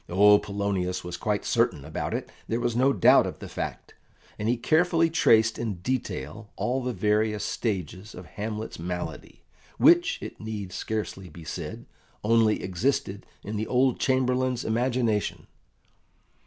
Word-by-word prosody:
Oh, 105 Hz, +3 st, +6 dB
Polonius 100 Hz, -3 st, -2 dB
was 90 Hz, 0 st, -5 dB
quite 105 Hz, +3 st, -2 dB
certain 70 Hz, -, +1 dB
about 80 Hz, -, -3 dB
it, -, -, -5 dB, 0.2 s
there 115 Hz, -, -1 dB
was 120 Hz, -1 st, -1 dB
no 130 Hz, +3 st, +4 dB
doubt 105 Hz, -, +5 dB
of -, -, -6 dB
the -, -, -8 dB
fact; -, -, -6 dB, 0.5 s
and 105 Hz, +2 st, -1 dB
he 120 Hz, -, +2 dB
carefully 165 Hz, +5 st, +3 dB
traced 110 Hz, -8 st, +4 dB
in 110 Hz, -4 st, -2 dB
detail 100 Hz, -, -4 dB
all 130 Hz, +2 st, -1 dB
the 125 Hz, 0 st, -2 dB
various 105 Hz, -1 st, +1 dB
stages 95 Hz, -2 st, -3 dB
of 90 Hz, -, -9 dB
Hamlet's 105 Hz, +4 st, -5 dB
malady, 90 Hz, +1 st, -6 dB, 0.3 s
which, 350 Hz, +4 st, +5 dB
it -, -, -8 dB
need 105 Hz, -4 st, -5 dB
scarcely 100 Hz, -3 st, -4 dB
be 85 Hz, +1 st, -12 dB
said, 80 Hz, -, -6 dB, 0.4 s
only 110 Hz, 0 st, +3 dB
existed 100 Hz, 0 st, -1 dB, 0.2 s
in 105 Hz, +1 st, -4 dB
the 110 Hz, -, -2 dB
old 130 Hz, 0 st, +2 dB
Chamberlain's 130 Hz, -1 st, +1 dB
imagination. 115 Hz, -2 st, 0 dB
110 Hz, 145 wpm, -26 LUFS, 95-125 Hz, 0.5 s, Oh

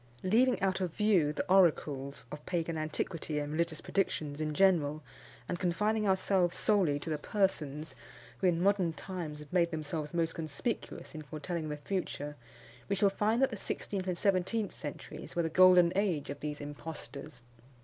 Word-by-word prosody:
Leaving 240 Hz, +7 st, +4 dB
out 190 Hz, 0 st, +1 dB
of 180 Hz, -3 st, -1 dB
view 195 Hz, -8 st, +3 dB
the -, -, -3 dB
oracles 150 Hz, -7 st, +2 dB
of 150 Hz, 0 st, -7 dB
pagan 165 Hz, -2 st, -1 dB
antiquity 155 Hz, 0 st, -3 dB
and 145 Hz, 0 st, -2 dB
religious 165 Hz, -1 st, -1 dB
predictions 155 Hz, -6 st, -1 dB
in 155 Hz, 0 st, -1 dB
general, 155 Hz, -6 st, +3 dB, 0.4 s
and 175 Hz, -, -3 dB
confining 210 Hz, +4 st, +1 dB
ourselves 190 Hz, -2 st, +2 dB
solely 190 Hz, -9 st, +3 dB
to 160 Hz, -, -5 dB
the 150 Hz, -, -1 dB
persons 155 Hz, -6 st, -1 dB, 0.5 s
who, -, -, +3 dB
in 170 Hz, -2 st, +2 dB
modern 190 Hz, -4 st, +3 dB
times, 170 Hz, -4 st, -5 dB
have 150 Hz, +1 st, -12 dB
made 170 Hz, -2 st, +4 dB
themselves 155 Hz, -1 st, -4 dB
most 165 Hz, -1 st, 0 dB
conspicuous 160 Hz, -, -4 dB
in 155 Hz, -, -6 dB
foretelling 155 Hz, +2 st, -4 dB
the 150 Hz, -, -3 dB
future, 150 Hz, -3 st, -3 dB, 0.5 s
we 200 Hz, -, +2 dB
shall 195 Hz, 0 st, +3 dB
find 220 Hz, +5 st, +2 dB
that 270 Hz, -, +3 dB
the -, -, -3 dB
sixteenth 190 Hz, -1 st, -3 dB
and 180 Hz, -2 st, -1 dB
seventeenth 200 Hz, +3 st, +1 dB
centuries 150 Hz, +1 st, -8 dB
were 170 Hz, -, +2 dB
the 165 Hz, -, 0 dB
golden 180 Hz, 0 st, +7 dB
age 175 Hz, -9 st, 0 dB
of 145 Hz, -, -7 dB
these 150 Hz, -1 st, -4 dB
impostors. 145 Hz, -2 st, -7 dB
170 Hz, 170 wpm, -32 LUFS, 150-190 Hz, 0.5 s, golden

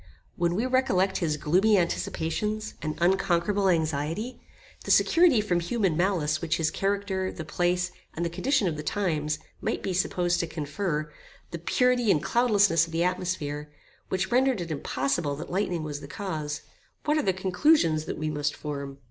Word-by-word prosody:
When 170 Hz, 0 st, 0 dB
we 225 Hz, +6 st, 0 dB
recollect 225 Hz, -8 st, +2 dB
his 155 Hz, -4 st, 0 dB
gloomy 190 Hz, +9 st, +3 dB
anticipations 210 Hz, +4 st, -1 dB
and 155 Hz, 0 st, -3 dB
unconquerable 190 Hz, +2 st, +2 dB
anxiety; 160 Hz, -, -1 dB, 0.4 s
the -, -, -8 dB
security 330 Hz, -10 st, +5 dB
from 180 Hz, -5 st, +1 dB
human 185 Hz, -1 st, 0 dB
malice 165 Hz, -4 st, +1 dB
which 165 Hz, -2 st, 0 dB
his 160 Hz, -1 st, +1 dB
character, 195 Hz, -1 st, -1 dB
the 160 Hz, -, -7 dB
place, 180 Hz, +2 st, 0 dB, 0.2 s
and 170 Hz, -, -1 dB
the -, -, 0 dB
condition 260 Hz, +3 st, +1 dB
of 160 Hz, -3 st, -2 dB
the -, -, -3 dB
times, 155 Hz, -4 st, -1 dB, 0.2 s
might -, -, -2 dB
be 190 Hz, -, -1 dB
supposed 175 Hz, -1 st, +1 dB
to 170 Hz, -, -1 dB
confer; 150 Hz, 0 st, -3 dB, 0.4 s
the 170 Hz, -, -5 dB
purity 250 Hz, +6 st, +2 dB
and 155 Hz, -5 st, +3 dB
cloudlessness 205 Hz, -9 st, +3 dB
of -, -, -11 dB
the 165 Hz, +1 st, +1 dB
atmosphere, 175 Hz, -5 st, -2 dB, 0.4 s
which 190 Hz, 0 st, -1 dB
rendered 255 Hz, -2 st, +3 dB
it 170 Hz, -2 st, -4 dB
impossible 140 Hz, +1 st, -1 dB
that 155 Hz, -, -8 dB
lightning 180 Hz, -3 st, -1 dB
was 145 Hz, -2 st, -4 dB
the -, -, -8 dB
cause; 155 Hz, -5 st, -4 dB, 0.4 s
what 300 Hz, -, +2 dB
are -, -, +2 dB
the 195 Hz, -, +2 dB
conclusions 185 Hz, -, +2 dB
that -, -, -4 dB
we 155 Hz, 0 st, -2 dB
must 145 Hz, -1 st, -1 dB
form? 140 Hz, -2 st, -6 dB
175 Hz, 170 wpm, -27 LUFS, 155-200 Hz, 0.4 s, security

